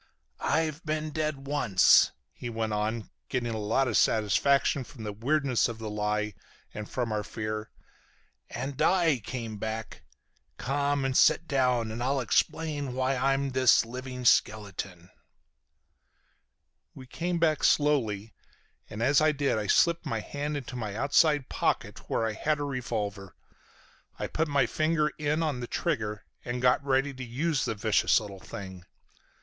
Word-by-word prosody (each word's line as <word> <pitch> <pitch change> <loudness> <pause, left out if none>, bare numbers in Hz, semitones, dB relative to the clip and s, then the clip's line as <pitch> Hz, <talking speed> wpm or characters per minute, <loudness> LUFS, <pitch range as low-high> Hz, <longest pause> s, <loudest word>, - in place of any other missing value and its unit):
"I've 160 0 0
been 155 0 -2
dead 150 -3 -2
once," 135 -10 +5 0.2
he 120 - -6
went 110 -1 -2
on, 110 +2 -2 0.2
getting 120 -2 -1
a 110 - -3
lot 115 +6 +1
of 115 - -1
satisfaction 135 +6 +3
from 120 -2 -11
the 105 -1 -4
weirdness 135 +3 +1
of 115 - -6
the 110 -1 -6
lie 105 0 -1 0.4
and 105 0 -7
from 120 -3 -2
our 105 -1 -1
fear, 110 +1 -5 0.8
"and 130 +3 -5
I 170 -7 +3
came 115 -3 -5
back. 110 +1 -5 0.6
Come 140 +2 0
and 130 -1 -1
sit - - +4
down 125 -4 +1
and 115 +2 -5
I'll 135 +2 +1
explain 145 +2 0
why 130 +1 +1
I'm 135 +1 +1
this 130 -2 +4
living 125 +1 -7
skeleton." 100 -5 +1 1.8
We 130 - -10
came 170 +7 -2
back 160 -3 +1
slowly, 115 -8 +2 0.6
and 105 +2 -4
as 140 +4 +4
I 155 0 +4
did 140 -6 0
I 105 - -3
slipped 170 - +3
my 115 - -1
hand 145 +6 -4
into 130 -2 -7
my 110 -5 -4
outside 145 +2 +3
pocket - - -2
where 115 - +1
I 110 - -1
had 150 +7 0
a - - -2
revolver. 110 -8 -4 0.8
I - - -3
put 160 +1 -1
my 140 -3 +2
finger 155 -1 +1
in 150 +2 0
on 150 -5 -1
the 120 - -5
trigger 110 - -2 0.2
and 120 0 -3
got 125 +2 +3
ready 135 +1 +1
to 130 0 -7
use 135 +5 -1
the 115 - -2
vicious 105 +2 +3
little 100 -3 -9
thing. 95 -2 -9
125 Hz, 155 wpm, -28 LUFS, 110-145 Hz, 1.8 s, once